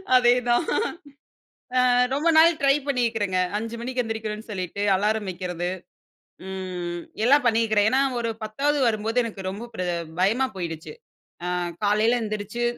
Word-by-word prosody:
அதேதான். 245 Hz, -1 st, +4 dB, 1.1 s
ஆ -, -, +6 dB, 0.3 s
ரொம்ப 305 Hz, +4 st, +2 dB
நாள் 330 Hz, 0 st, +6 dB
ட்ரை 275 Hz, 0 st, +5 dB
பண்ணியிருக்குறேங்க. 225 Hz, -8 st, 0 dB, 0.2 s
5:00 230 Hz, +1 st, -4 dB
மணிக்கு 250 Hz, +1 st, -2 dB
எந்திரிக்கிறேன்னு 220 Hz, 0 st, -5 dB
சொல்லிட்டு 185 Hz, +1 st, -4 dB
அலாரம் 210 Hz, +1 st, 0 dB
வைக்கிறது. 180 Hz, -1 st, -3 dB, 0.8 s
ம். 180 Hz, -2 st, -4 dB, 0.2 s
எல்லாம் 280 Hz, +2 st, +5 dB
பண்ணிருக்கிறேன். 220 Hz, -2 st, +3 dB
ஏன்னா 265 Hz, +1 st, +3 dB, 0.2 s
ஒரு 230 Hz, -1 st, -1 dB
10வது 285 Hz, +7 st, 0 dB
வரும்போது 225 Hz, +2 st, +1 dB
எனக்கு 210 Hz, -4 st, -6 dB
ரொம்ப 210 Hz, +5 st, -7 dB
ப்ர 180 Hz, -, -3 dB, 0.4 s
பயமா 235 Hz, +8 st, +2 dB
போயிடுச்சு. 165 Hz, -, -5 dB, 0.5 s
ஆ -, -, -1 dB, 0.4 s
காலையில 220 Hz, +4 st, +3 dB
எந்தரிச்சு. 215 Hz, +2 st, -4 dB
220 Hz, 125 wpm, -24 LUFS, 195-245 Hz, 1.1 s, ஆ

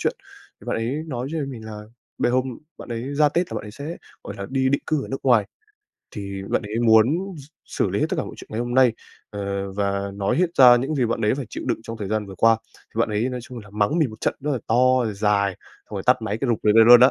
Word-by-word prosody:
chuyện, -, -, 0 dB, 0.5 s
bạn -, -, -1 dB
ấy 115 Hz, +4 st, -1 dB
nói 130 Hz, -2 st, -4 dB
với 155 Hz, -4 st, -2 dB
mình 120 Hz, -5 st, -8 dB
là 105 Hz, -1 st, -7 dB, 0.4 s
bê -, -, +2 dB
hôm 130 Hz, -1 st, -1 dB, 0.2 s
bạn -, -, -10 dB
ấy 120 Hz, +4 st, -4 dB
ra 150 Hz, 0 st, +4 dB
Tết 175 Hz, +4 st, -1 dB
là -, -, -3 dB
bạn -, -, -5 dB
ấy -, -, -8 dB
sẽ, 150 Hz, +9 st, -7 dB, 0.3 s
gọi 100 Hz, -, -6 dB
là, 100 Hz, 0 st, -5 dB
đi 130 Hz, 0 st, +1 dB
định 140 Hz, -, +1 dB
cư 155 Hz, -3 st, 0 dB
ở -, -, -10 dB
nước 135 Hz, -, -4 dB
ngoài, 115 Hz, -6 st, +4 dB, 0.7 s
thì 100 Hz, -2 st, -5 dB
bạn -, -, 0 dB
ấy 105 Hz, +2 st, -4 dB
muốn 110 Hz, 0 st, +7 dB, 0.3 s
x 140 Hz, -, -9 dB, 0.2 s
xử -, -, -1 dB
lý -, -, -1 dB
hết -, -, +2 dB
tất -, -, -2 dB
cả -, -, -1 dB
mọi -, -, -8 dB
chuyện -, -, -12 dB
ngày 110 Hz, -, -2 dB
hôm 120 Hz, 0 st, -3 dB
nay, 130 Hz, -3 st, +5 dB, 0.4 s
ờ, 100 Hz, -1 st, -4 dB
và 100 Hz, 0 st, -1 dB
nói 100 Hz, -1 st, 0 dB
hết 180 Hz, +1 st, +3 dB
ra 125 Hz, -2 st, +9 dB
những 135 Hz, +6 st, -1 dB
gì 130 Hz, -5 st, +1 dB
bạn 115 Hz, 0 st, -2 dB
ấy 105 Hz, -, +3 dB
phải 135 Hz, -4 st, -5 dB
chịu -, -, -5 dB
đựng -, -, 0 dB
trong 115 Hz, 0 st, -7 dB
thời 100 Hz, -2 st, -4 dB
gian 110 Hz, -1 st, -1 dB
vừa 95 Hz, -, -9 dB
qua. 115 Hz, +4 st, +4 dB, 0.2 s
Thì 115 Hz, -, -6 dB
bạn 115 Hz, -, +2 dB
ấy 110 Hz, +4 st, 0 dB
nói 125 Hz, -1 st, -4 dB
chung 125 Hz, 0 st, -9 dB
là 105 Hz, -2 st, -12 dB
mắng 105 Hz, +10 st, +1 dB
mình 145 Hz, -8 st, +2 dB
một 110 Hz, -, -12 dB
trận -, -, 0 dB
rất 150 Hz, -, -2 dB
là 130 Hz, -, 0 dB
to 125 Hz, +2 st, +3 dB
rồi 110 Hz, -2 st, -2 dB
dài, 100 Hz, -1 st, +2 dB
xong -, -, -16 dB
rồi 95 Hz, -, -3 dB
tắt 125 Hz, -2 st, +4 dB
máy 105 Hz, 0 st, -2 dB
cái 130 Hz, -, -1 dB
rụp 115 Hz, -, +2 dB
rồi 105 Hz, 0 st, +4 dB
về 115 Hz, -, +9 dB
luôn 120 Hz, 0 st, +10 dB
đó 130 Hz, +2 st, +8 dB
115 Hz, 290 wpm, -23 LUFS, 105-130 Hz, 0.7 s, luôn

